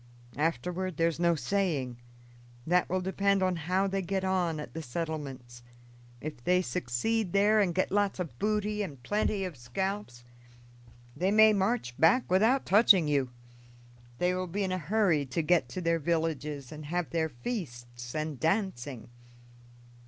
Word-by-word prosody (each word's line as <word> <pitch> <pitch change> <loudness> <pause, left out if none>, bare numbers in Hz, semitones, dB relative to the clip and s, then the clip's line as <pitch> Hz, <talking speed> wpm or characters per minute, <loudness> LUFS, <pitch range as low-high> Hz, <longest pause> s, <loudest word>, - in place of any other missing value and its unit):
Afterward 175 +3 -1
there's 165 0 +1
no 170 -1 +3
saying 145 -4 -1 0.7
that 180 +2 +2
will 185 +1 0
depend 195 +1 +1
on 185 -1 +1
how 180 +4 0
they 195 0 -1
get 190 +1 -2
on 180 -4 0
at 150 - -8
the 165 - -5
settlements. 135 -5 -5 0.6
If 150 -5 -7
they 180 +4 +3
succeed 170 - -1
there 205 +2 +4
and 180 -5 +1
get 185 - 0
lots 205 -1 +1
of 150 -10 -5
booty 210 0 0
and 145 -11 -6
plenty 205 -1 0
of 180 -4 -6
scalps, 125 +1 -4 0.9
they 185 +2 0
may 215 +1 +6
march 195 - 0
back 180 +8 +4
without 225 +8 +3
touching 195 -5 +6
you; 140 -3 +1 0.9
they 180 +4 +1
will 185 0 -2
be 200 +4 -2
in 190 - -1
a 185 - -1
hurry 180 -3 +2
to 155 +6 -1
get 175 +2 +2
to 185 - -5
their 165 -1 +1
villages 150 -4 -2
and 155 -1 -8
have 175 +1 -2
their 160 -1 0
feasts 120 - -6
and 155 -3 -3
dancing. 160 - -1
175 Hz, 155 wpm, -29 LUFS, 150-195 Hz, 0.9 s, may